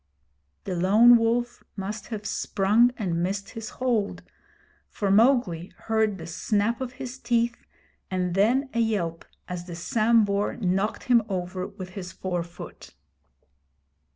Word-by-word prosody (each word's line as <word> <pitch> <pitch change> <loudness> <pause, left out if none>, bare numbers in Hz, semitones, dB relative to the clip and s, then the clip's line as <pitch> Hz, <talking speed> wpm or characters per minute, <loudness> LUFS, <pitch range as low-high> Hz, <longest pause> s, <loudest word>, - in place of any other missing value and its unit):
The 185 - -3
Lone 210 +7 +6
Wolf 240 +1 0
must 205 +2 -5
have 215 -3 -6
sprung 210 +4 +2
and 175 -6 -1
missed 195 +2 -2
his 225 -2 -6
hold, 235 -6 -1 0.7
for 200 -2 -1
Mowgli 210 -6 +3
heard 220 -2 0
the 165 - -8
snap 210 +7 0
of 255 -1 -4
his 255 +1 -7
teeth 235 -1 0 0.4
and 180 -1 -1
then 250 +8 +2
a 235 - 0
yelp 190 -8 -1 0.2
as 180 -1 -5
the 175 - -6
Sambhur 205 +2 +2
knocked 195 +1 0
him 240 -2 +4
over 185 -1 -3
with 185 -1 -9
his 180 -1 -7
fore 180 -2 -2
foot. 170 +1 -11
205 Hz, 135 wpm, -26 LUFS, 185-235 Hz, 0.7 s, Lone